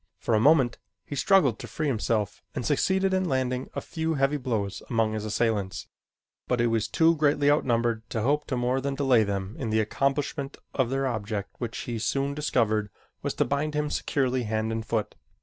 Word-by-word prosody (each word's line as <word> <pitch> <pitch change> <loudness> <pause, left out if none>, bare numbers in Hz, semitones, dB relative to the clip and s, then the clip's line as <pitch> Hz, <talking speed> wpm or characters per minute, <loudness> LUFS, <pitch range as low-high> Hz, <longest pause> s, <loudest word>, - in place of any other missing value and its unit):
For 115 - -1
a 110 - +4
moment 135 -2 +4 0.3
he 145 - -6
struggled 140 - +3
to 120 - -7
free 135 +8 -3
himself 110 -6 -1
and 120 - -3
succeeded 190 +6 +2
in 185 -2 +1
landing 130 -1 -1
a - - -2
few 160 -1 -2
heavy 135 +1 +2
blows 110 -7 -2
among 115 -2 +1
his 110 0 -3
assailants, 105 -3 -1 0.6
but 125 - +1
he 120 - +3
was 115 -2 +1
too 165 0 +4
greatly 145 -1 +3
outnumbered 120 -5 +1
to 110 - -2
hope 145 +4 +1
to 130 - -1
more 125 +2 +1
than 140 0 -2
delay 135 -5 +4
them 100 0 -3
in 115 - -2
the 110 +1 +2
accomplishment 140 +5 -1 0.2
of 130 -3 +1
their 135 +1 0
object 105 -4 -3
which 120 -2 -4
he 120 -2 -4
soon 140 +5 0
discovered 110 -8 +1 0.3
was - - -2
to - - +2
bind 150 +2 -1
him 150 0 0
securely 130 -2 0
hand 110 0 -1
and 110 0 -3
foot. 110 -2 -1
125 Hz, 195 wpm, -27 LUFS, 110-145 Hz, 0.6 s, a